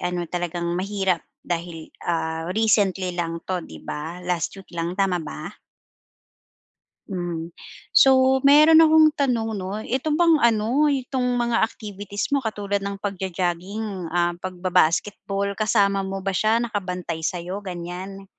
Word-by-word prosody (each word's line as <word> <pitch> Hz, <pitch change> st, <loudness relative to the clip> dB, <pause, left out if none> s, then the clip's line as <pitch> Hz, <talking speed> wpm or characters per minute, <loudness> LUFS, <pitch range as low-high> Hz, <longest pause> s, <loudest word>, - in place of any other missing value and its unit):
ano 175 Hz, 0 st, -2 dB
talagang 175 Hz, 0 st, -3 dB
mahirap 190 Hz, -1 st, 0 dB, 0.2 s
dahil, 170 Hz, -2 st, -5 dB, 0.2 s
ah, 160 Hz, -1 st, -1 dB
recently 200 Hz, -4 st, +2 dB
lang 170 Hz, -1 st, -4 dB
'to 185 Hz, -1 st, -2 dB
'di 80 Hz, -1 st, -12 dB
ba, 165 Hz, +4 st, -6 dB
last 175 Hz, 0 st, -2 dB
week 190 Hz, -2 st, -14 dB
lang 170 Hz, +1 st, -3 dB
tama 190 Hz, -3 st, +1 dB
ba? 160 Hz, +4 st, -8 dB, 1.5 s
Hmm. 175 Hz, -3 st, -4 dB, 0.4 s
So 265 Hz, 0 st, +5 dB
meron 305 Hz, +4 st, +7 dB
akong 315 Hz, -1 st, +6 dB
tanong 235 Hz, -6 st, 0 dB
'no, 195 Hz, 0 st, -4 dB
ito 265 Hz, +5 st, -1 dB
bang 335 Hz, -3 st, +4 dB
ano, 235 Hz, +6 st, +3 dB
itong 255 Hz, -2 st, -1 dB
mga 235 Hz, -1 st, +1 dB
activities 205 Hz, -2 st, -3 dB
mo 280 Hz, -, +2 dB
katulad 205 Hz, -3 st, -2 dB
ng 200 Hz, 0 st, -4 dB
pagjo-jogging, 190 Hz, 0 st, -3 dB
ah, 175 Hz, 0 st, +1 dB
pagbaba-basketball 185 Hz, +2 st, 0 dB
kasama 200 Hz, -2 st, +2 dB
mo 195 Hz, 0 st, -4 dB
ba 195 Hz, -, 0 dB
siya, 215 Hz, +4 st, +2 dB
nakabantay 185 Hz, -7 st, -3 dB
sa'yo 180 Hz, +4 st, -3 dB
gan'yan? 185 Hz, +1 st, -7 dB
195 Hz, 130 wpm, -23 LUFS, 175-220 Hz, 1.5 s, meron